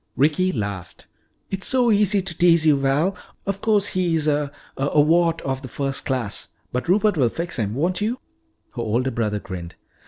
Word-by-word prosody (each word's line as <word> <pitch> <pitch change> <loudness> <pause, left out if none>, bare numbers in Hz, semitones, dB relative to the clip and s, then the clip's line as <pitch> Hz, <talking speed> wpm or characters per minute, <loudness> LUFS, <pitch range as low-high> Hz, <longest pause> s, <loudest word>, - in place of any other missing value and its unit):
Ricky 155 +7 +2
laughed. 100 - -5 0.5
"It's 195 -1 -3
so 250 -3 +3
easy 205 -2 +3
to 175 -3 -4
tease 170 -2 +4
you, 150 -2 +6
Val. 140 +7 +1 0.3
Of 195 0 -3
course 210 -2 +2
he 180 -3 0
is 155 -1 0
a 145 -1 +1 0.2
a 140 +2 +1
wart 165 +3 +3
of 135 -1 -2
the 135 - -7
first 135 +2 -3
class. 125 -6 -2 0.2
But 125 +6 -3
Rupert 205 0 +3
will 125 -5 +3
fix 170 +1 -4
him 105 0 -1
won't 175 +8 0
you?" 220 +4 0 0.6
Her 120 - -3
older 120 +4 0
brother 105 -3 -1
grinned. 90 -4 -7
150 Hz, 185 wpm, -22 LUFS, 130-185 Hz, 0.6 s, you